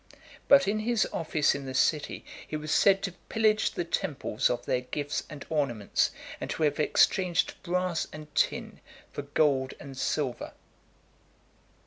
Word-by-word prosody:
But 280 0 +7
in 210 +2 +1
his 230 0 +1
office 155 -2 +1
in 140 -1 -6
the 130 - -5
city, 150 +2 +1 0.2
he - - -5
was 155 0 -5
said 195 +2 +4
to 195 - -1 0.2
pillage 220 -1 +3
the - - -2
temples 145 -9 -1
of 120 0 -2
their 125 - 0
gifts 145 +3 -3
and 150 -3 -9
ornaments, 135 -10 0 0.3
and - - -5
to 160 - -2
have 150 -1 +1
exchanged 175 +3 +2
brass 180 -2 -1
and 150 0 -10
tin - - 0 0.3
for - - -4
gold 140 -2 +1
and 140 -2 -9
silver. 130 -1 -2
155 Hz, 150 wpm, -28 LUFS, 140-185 Hz, 0.3 s, But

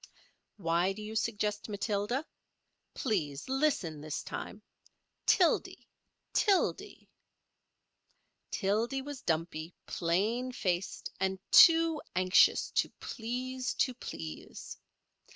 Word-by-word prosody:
Why 175 0 +1
do 215 - -9
you 215 +1 -6
suggest 210 -1 -1
Matilda? 210 +6 -1 0.7
Please 155 - -2
listen 260 - 0
this 155 0 -4
time—Tildy—Tildy. 380 +2 -1 1.4
Tildy 225 +7 0
was 285 -2 -7
dumpy, 165 0 -2
plain 210 +9 0
faced, 180 -4 -2
and 190 0 0
too 330 -2 +7
anxious 185 +1 +4
to - - +1
please 255 +2 -4
to 255 - +1
please. 80 - -8
210 Hz, 80 wpm, -31 LUFS, 175-255 Hz, 1.4 s, too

